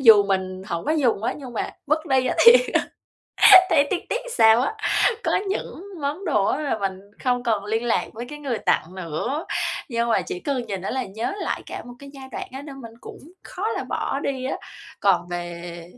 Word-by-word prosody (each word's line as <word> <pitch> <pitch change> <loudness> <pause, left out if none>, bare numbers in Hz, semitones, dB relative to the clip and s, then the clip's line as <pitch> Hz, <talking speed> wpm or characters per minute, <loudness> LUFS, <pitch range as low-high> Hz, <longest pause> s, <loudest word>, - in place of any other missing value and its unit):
dù 225 -5 +8
mình 190 -1 -2
hổng 170 0 -3
có 305 - +1
dùng 250 -9 +1
á, - - 0
nhưng 265 -4 -9
mà 225 - -3 0.2
vứt 310 +3 0
đi 265 -3 +2
á - - 0
thì 470 - +13 1.2
thấy 285 -4 +4
tiếc 360 - 0
tiếc - - 0
làm - - -10
sao 225 +1 +6
á. 280 - -1 0.5
Có - - +1 0.2
những 385 -2 -4 0.2
món 295 +7 -3
đồ 240 - +2
á 290 - 0
là 280 -7 -1
mình 190 -1 -3 0.2
không 245 -1 +1
còn 215 -4 0
liên 220 +3 -1
lạc 235 - +1
với 235 +2 -7
cái 295 - -8
người 270 -6 -3
tặng 170 +3 0
nữa, 185 - -3 0.4
nhưng 235 -2 -1
mà 230 - +3
chỉ 375 -1 -6
cần 275 -7 -2
nhìn 195 -4 -4
nó 190 - -4
là 260 -1 -2
nhớ 220 - -4
lại - - -2
cả - - -6
một 245 - -10
cái 280 0 -11
giai 265 -1 -10
đoạn - - -5
á 265 +1 -7
nên 280 -2 -9
mình 230 -2 -10
cũng - - -10 0.3
khó 390 +4 -3
là 455 - -3
bỏ 275 - -2
đi 265 -3 -3
á. 265 - -2 0.4
Còn 180 -4 +2
về 175 -1 -6
245 Hz, 220 wpm, -23 LUFS, 200-280 Hz, 1.2 s, thì